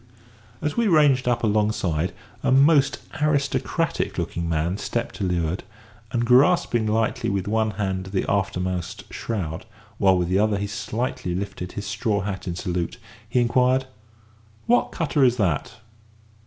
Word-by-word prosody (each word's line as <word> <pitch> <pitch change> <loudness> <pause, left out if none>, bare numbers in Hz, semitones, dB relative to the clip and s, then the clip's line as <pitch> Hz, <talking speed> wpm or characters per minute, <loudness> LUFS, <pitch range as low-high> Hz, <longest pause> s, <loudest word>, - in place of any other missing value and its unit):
As 150 -1 -1
we 235 -1 +2
ranged 145 -8 +4
up 120 -1 +1
alongside, 105 -6 +1 0.3
a - - +1
most 140 +1 +5 0.2
aristocratic 145 -2 0
looking 85 0 -2
man 85 +4 0
stepped 120 - -3
to - - -3
leeward, 90 -1 -1 0.5
and, 120 -1 0
grasping 125 -3 +4
lightly 110 +1 0
with 100 -1 -1
one 110 +1 +1
hand 95 -2 -2
the 95 0 -1
aftermost 95 0 -2
shroud, 90 -6 -4 0.3
while 95 -2 +5
with 90 -1 0
the 95 +2 +2
other 105 -1 +2
he 100 - -2
slightly 105 -2 -3
lifted 95 -2 -5
his 100 - -5
straw 110 -2 -1
hat 95 -1 -5
in 85 - -2
salute, 90 +3 -3 0.3
he 125 - +2
inquired: 125 +2 +3 0.8
"What 245 +1 +3
cutter 150 -4 +1
is 125 -1 +4
that?" 90 - 0
105 Hz, 145 wpm, -24 LUFS, 95-125 Hz, 0.8 s, most